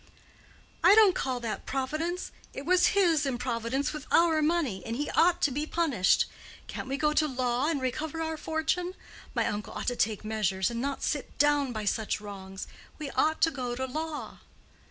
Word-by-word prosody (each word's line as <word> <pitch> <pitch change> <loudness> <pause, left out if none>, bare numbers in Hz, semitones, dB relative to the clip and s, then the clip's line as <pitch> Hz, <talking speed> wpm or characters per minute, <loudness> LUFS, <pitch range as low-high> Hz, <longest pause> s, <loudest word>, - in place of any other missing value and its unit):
"I 405 - +8
don't 430 -4 +7
call 260 -5 -2
that 225 -2 -4
Providence: 310 +7 -2 0.2
it 275 - -6
was 365 +3 +4
his 330 -6 +4
improvidence 255 +1 -1
with 300 -1 -7
our 330 -2 +4
money, 300 - +1
and 230 - -4
he 290 +4 -2
ought 345 +1 +3
to 290 - +4
be 295 +4 -2
punished. 285 - +2 0.4
Can't - - -6
we 270 +1 -2
go 300 0 +2
to 305 0 +3
law 255 0 0
and 315 -4 0
recover 295 +5 -3
our 320 0 -2
fortune? 320 +4 -1 0.4
My - - +2
uncle 210 0 -3
ought - - -5
to 245 - -3
take 215 -2 0
measures, 210 -1 0
and 235 0 -3
not 275 +1 -3
sit 290 -3 -2
down 290 -2 +3
by 215 -3 -4
such 215 +1 0
wrongs. 195 -2 -8 0.3
We 300 -3 -5
ought 315 +1 +1
to 325 - +5
go 250 -4 -3
to 260 +1 -2
law." 310 +3 -5
280 Hz, 185 wpm, -29 LUFS, 240-315 Hz, 0.4 s, I